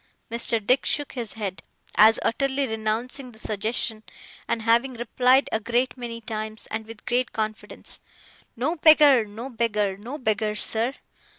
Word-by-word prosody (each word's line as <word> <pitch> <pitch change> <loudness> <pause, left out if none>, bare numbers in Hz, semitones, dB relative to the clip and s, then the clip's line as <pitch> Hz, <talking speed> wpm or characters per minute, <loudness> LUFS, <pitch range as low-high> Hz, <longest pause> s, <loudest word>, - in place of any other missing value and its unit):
Mr. 235 0 0
Dick 255 +4 +3
shook 290 -1 -1
his 235 -5 -5
head, 200 -4 -5 0.3
as 220 +2 +7
utterly 275 +2 0
renouncing 235 +4 -3
the - - -16
suggestion; 220 +1 -2 0.5
and 225 - -1
having 235 +3 +2
replied 250 +3 +3
a 220 - +1
great 240 +4 0
many 240 -2 -6
times, 220 -1 -4
and 220 0 -4
with 225 -1 -12
great 245 +1 0
confidence, 215 0 -5 0.6
'No 295 +9 -1
beggar, 295 -6 +6
no 220 +5 -8
beggar, 210 -4 0
no 240 +8 -7
beggar, 215 -4 0
sir! 230 +5 +1
230 Hz, 150 wpm, -25 LUFS, 220-255 Hz, 0.6 s, as